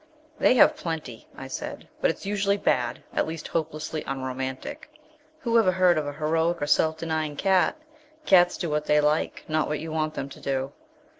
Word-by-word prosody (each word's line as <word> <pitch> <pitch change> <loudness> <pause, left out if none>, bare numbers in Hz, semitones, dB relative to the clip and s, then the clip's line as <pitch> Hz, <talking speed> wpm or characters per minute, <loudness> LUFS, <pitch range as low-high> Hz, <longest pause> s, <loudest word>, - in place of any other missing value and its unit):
"They - - +5
have 245 - +6
plenty," 155 -9 -6
I - - -7
said, - - -6
"but - - +3
it's - - -4
usually 200 0 +1
bad 125 -10 0
at - - +1
least 160 -1 -6
hopelessly 155 -1 -3
unromantic. 130 - -5 0.5
Who 235 -4 +3
ever 190 -5 +4
heard 180 -1 +4
of 155 -2 -1
a 145 - -4
heroic 160 +3 0
or 145 - -1
self 160 +2 +2
denying 160 -2 -2
cat? 190 - +2 0.5
Cats 175 -5 +5
do 175 - -2
what 150 -1 -1
they 150 0 +4
like, 150 +1 0
not 155 0 +1
what 150 - -2
you 160 +1 -6
want 155 -1 -1
them 135 - -3
to - - -12
do." 135 0 -2
155 Hz, 190 wpm, -26 LUFS, 145-175 Hz, 0.5 s, have